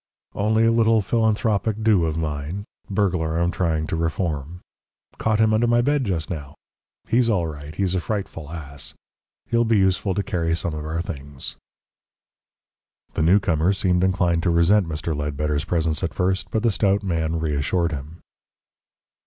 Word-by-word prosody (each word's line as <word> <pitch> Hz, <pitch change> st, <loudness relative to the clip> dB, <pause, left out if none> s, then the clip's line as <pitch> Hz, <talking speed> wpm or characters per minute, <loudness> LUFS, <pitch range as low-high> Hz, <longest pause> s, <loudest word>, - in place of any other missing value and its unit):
"Only 110 Hz, +2 st, +2 dB
a 115 Hz, -, +4 dB
little 115 Hz, -1 st, +4 dB
philanthropic 110 Hz, 0 st, +1 dB
do 105 Hz, -6 st, +4 dB
of 80 Hz, 0 st, -2 dB
mine 80 Hz, +5 st, -3 dB, 0.2 s
burglar 90 Hz, -5 st, 0 dB
I'm 85 Hz, +1 st, +1 dB
trying 80 Hz, -4 st, 0 dB
to 80 Hz, -, -2 dB
reform. 80 Hz, 0 st, -2 dB, 0.6 s
Caught 110 Hz, -1 st, +1 dB
him 110 Hz, 0 st, +4 dB
under 115 Hz, +2 st, +3 dB
my 120 Hz, 0 st, +4 dB
bed 145 Hz, 0 st, +1 dB
just 90 Hz, -6 st, -1 dB
now. 75 Hz, -5 st, -6 dB, 0.5 s
He's 120 Hz, 0 st, +3 dB
all 95 Hz, -6 st, +2 dB
right. 75 Hz, -1 st, -7 dB
He's 95 Hz, -1 st, 0 dB
a 95 Hz, -, 0 dB
frightful 85 Hz, -5 st, -4 dB
ass. 70 Hz, -4 st, -7 dB, 0.6 s
He'll 120 Hz, 0 st, +4 dB
be 115 Hz, -1 st, +3 dB
useful 95 Hz, 0 st, +2 dB
to 100 Hz, -, 0 dB
carry 85 Hz, -3 st, 0 dB
some 85 Hz, -1 st, -2 dB
of 75 Hz, -1 st, -4 dB
our 80 Hz, +2 st, -2 dB
things." 70 Hz, -4 st, -7 dB, 1.6 s
The -, -, -1 dB
newcomer 85 Hz, 0 st, +3 dB
seemed 90 Hz, -2 st, +1 dB
inclined 90 Hz, -3 st, +2 dB
to 85 Hz, -, +1 dB
resent 85 Hz, +3 st, +4 dB
Mr. 80 Hz, 0 st, -2 dB
Ledbetter's 75 Hz, +1 st, -1 dB
presence 80 Hz, -2 st, 0 dB
at 95 Hz, -, -3 dB
first, 95 Hz, 0 st, 0 dB
but 110 Hz, -, -1 dB
the 115 Hz, -, +3 dB
stout 100 Hz, 0 st, +1 dB
man 80 Hz, -3 st, -1 dB
reassured 80 Hz, +3 st, 0 dB
him. 75 Hz, +3 st, -7 dB
85 Hz, 160 wpm, -23 LUFS, 80-100 Hz, 1.6 s, a